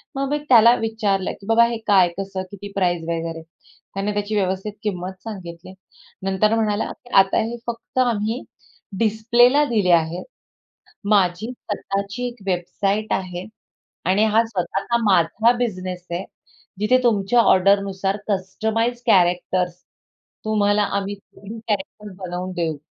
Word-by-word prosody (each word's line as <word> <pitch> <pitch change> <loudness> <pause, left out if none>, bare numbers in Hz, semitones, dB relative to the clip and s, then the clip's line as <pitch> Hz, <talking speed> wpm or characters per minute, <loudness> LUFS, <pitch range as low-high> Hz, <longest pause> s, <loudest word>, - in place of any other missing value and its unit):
मग 275 0 -1
मी 295 - +1
त्याला 235 -1 +7
विचारलं 215 -4 -1
की, - - -12
"बाबा, 230 +1 +5
हे 235 0 -3
काय, 195 -4 +6
कसं, 195 -1 -4
किती 200 0 -9
प्राईस 175 -3 +1
वगैरे?" 165 -1 -3 0.5
त्याने 195 +2 -2
त्याची 205 +1 -2
व्यवस्थित 190 +1 -1
किंमत 185 -2 -4
सांगितली. 185 -5 -8 0.5
नंतर 195 +3 +2
म्हणाला, 215 -1 0 0.3
"आता 195 0 0
हे 230 +2 -3
फक्त 235 +2 -4
आम्ही 230 0 0 0.6
डिस्प्लेला 235 +5 +4
दिले 210 -9 +1
आहेत, 165 0 +2 0.9
माझी 195 +1 +2
स्वतःची 200 0 -4
एक 240 -3 -12
वेबसाईट 195 +3 -1
आहे 180 -1 -3 0.6
आणि 195 +4 +3
हा 220 +1 +4
स्वतःचा 195 +2 -2
माझा 195 +4 +3
बिझनेस 185 -6 -3
आहे, 175 +2 -3 0.6
जिथे 215 +5 +4
तुमच्या 230 -1 +3
ऑर्डरनुसार 195 -1 +3
कस्टमाइज्ड 220 +5 -1
कॅरेक्टर्स 180 0 +2 0.7
तुम्हाला 210 -1 +2 0.2
आम्ही 200 +1 -3
थ्रीडी 205 +2 -12
कॅरेक्टर 210 0 -3
बनवून 180 +1 -4
देऊ." 165 -4 -2
200 Hz, 125 wpm, -22 LUFS, 185-220 Hz, 0.9 s, त्याला